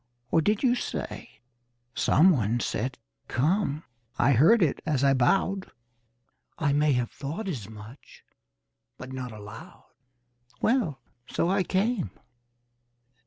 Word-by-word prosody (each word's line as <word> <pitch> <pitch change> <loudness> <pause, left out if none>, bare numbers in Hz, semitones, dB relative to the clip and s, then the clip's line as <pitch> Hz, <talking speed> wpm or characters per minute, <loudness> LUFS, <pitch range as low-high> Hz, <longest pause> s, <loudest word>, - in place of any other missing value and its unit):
Or 165 - +4
did 210 - +1
you 250 -2 +4
say 245 - -5 0.5
Someone 125 - +3
said 125 +3 -2 0.3
'Come' 155 +2 0 0.3
I 135 - +4
heard 165 - +5
it 155 - 0
as 145 -4 0
I 135 -1 +5
bowed." 190 +9 +1 0.9
"I 145 -4 +1
may 145 0 +3
have 125 -2 -1
thought 160 +10 -5
as 120 - -4
much, 110 +5 -13 0.7
but 125 +1 -8
not 130 -2 -5
aloud." 105 +1 -11 0.7
"Well, 215 - +1 0.3
so 170 - 0
I 195 0 +2
came." 195 - 0
145 Hz, 120 wpm, -27 LUFS, 125-190 Hz, 0.9 s, heard